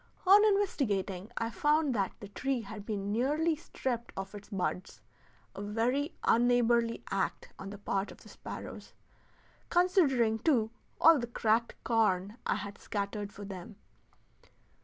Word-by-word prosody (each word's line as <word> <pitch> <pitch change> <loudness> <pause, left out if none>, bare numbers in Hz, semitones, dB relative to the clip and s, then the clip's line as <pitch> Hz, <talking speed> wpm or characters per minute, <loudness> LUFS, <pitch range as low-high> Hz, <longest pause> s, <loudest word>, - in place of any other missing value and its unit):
On 400 +3 +8
investigating 230 - +1
I 230 0 -1
found 295 +5 +2
that 195 -4 0
the 205 - -8
tree 260 +4 -1
had 210 -1 -9
been 205 -2 -2
nearly 300 +8 +1
stripped 250 -6 -4
of 195 +1 -5
its 205 -1 -10
buds 185 -2 -3 0.5
a - - -7
very 240 - 0
unneighborly 235 -1 +3
act 195 -1 -1
on 195 - -6
the 205 - -8
part 195 0 -2
of - - -14
the - - -14
sparrows, - - -8 0.8
considering, 285 - +3
too, 225 -6 +2 0.3
all 325 -2 +7
the 240 - -3
cracked 230 0 +1
corn 210 -2 +1
I - - +2
had 200 -1 -6
scattered 205 0 -3
for 205 0 -9
them. 195 +1 -8
225 Hz, 140 wpm, -31 LUFS, 200-270 Hz, 0.8 s, On